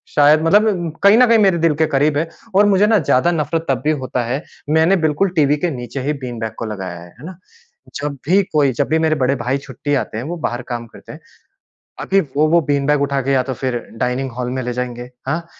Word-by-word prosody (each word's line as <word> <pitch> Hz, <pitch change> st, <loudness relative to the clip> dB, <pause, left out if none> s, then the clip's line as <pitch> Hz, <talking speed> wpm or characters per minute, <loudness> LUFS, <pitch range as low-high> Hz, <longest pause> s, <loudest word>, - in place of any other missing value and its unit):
शायद 150 Hz, +1 st, +5 dB
मतलब 180 Hz, -3 st, +2 dB
कहीं 200 Hz, +2 st, +7 dB
न 250 Hz, -, +7 dB
कहीं 230 Hz, -1 st, +5 dB
मेरे 195 Hz, -4 st, +3 dB
दिल 165 Hz, -, +3 dB
के -, -, +5 dB
करीब 145 Hz, +2 st, +1 dB
है 160 Hz, +2 st, 0 dB, 0.3 s
और 205 Hz, -, +6 dB
मुझे 205 Hz, 0 st, +4 dB
ना, 220 Hz, -, +4 dB
ज़्यादा 150 Hz, +3 st, +2 dB
नफ़रत 160 Hz, 0 st, -2 dB
तब 130 Hz, -2 st, 0 dB
भी 150 Hz, -, +2 dB
होता 125 Hz, -1 st, -2 dB
है, 130 Hz, +6 st, -3 dB, 0.3 s
मैंने 160 Hz, +5 st, +4 dB
बिल्कुल 155 Hz, +6 st, +1 dB
टीवी 150 Hz, -2 st, +3 dB
के 175 Hz, +4 st, -1 dB
नीचे 125 Hz, 0 st, -6 dB
ही 145 Hz, +3 st, -1 dB
बीन 120 Hz, -2 st, -5 dB
बैग 110 Hz, -1 st, -4 dB
को -, -, -3 dB
लगाया 95 Hz, -5 st, -6 dB
है। 85 Hz, -, -12 dB
है -, -, -11 dB
ना? 180 Hz, 0 st, -9 dB, 0.6 s
जब 145 Hz, 0 st, -4 dB
भी 190 Hz, +4 st, +4 dB
कोई 145 Hz, -3 st, +3 dB
जब 120 Hz, -, -1 dB
भी 160 Hz, +1 st, +2 dB
मेरे 160 Hz, -1 st, +2 dB
बड़े 135 Hz, -1 st, +1 dB
भाई 125 Hz, +1 st, -1 dB
छुट्टी 140 Hz, +1 st, -5 dB
आते 125 Hz, -, -3 dB
हैं 115 Hz, -, -4 dB
वो 175 Hz, +3 st, -5 dB
बाहर 120 Hz, +1 st, -4 dB
काम 120 Hz, -1 st, -4 dB
करते -, -, -14 dB
हैं। -, -, -11 dB, 0.8 s
अभी 195 Hz, -, +2 dB, 0.2 s
वो 155 Hz, -, +4 dB
वो 170 Hz, 0 st, +4 dB
बीन 140 Hz, -1 st, +1 dB
बैग 150 Hz, -1 st, +2 dB
उठा 140 Hz, -1 st, 0 dB
के 135 Hz, +2 st, -2 dB
या 130 Hz, -2 st, +2 dB
तो 130 Hz, -, -4 dB
फिर 125 Hz, 0 st, -3 dB, 0.2 s
डाइनिंग 125 Hz, +1 st, -1 dB
हॉल 125 Hz, -1 st, -2 dB
में 130 Hz, 0 st, -3 dB
ले 125 Hz, +1 st, -3 dB
जाएँगे 125 Hz, 0 st, -5 dB, 0.2 s
हाँ, 165 Hz, +5 st, -2 dB
145 Hz, 245 wpm, -18 LUFS, 125-165 Hz, 0.8 s, कहीं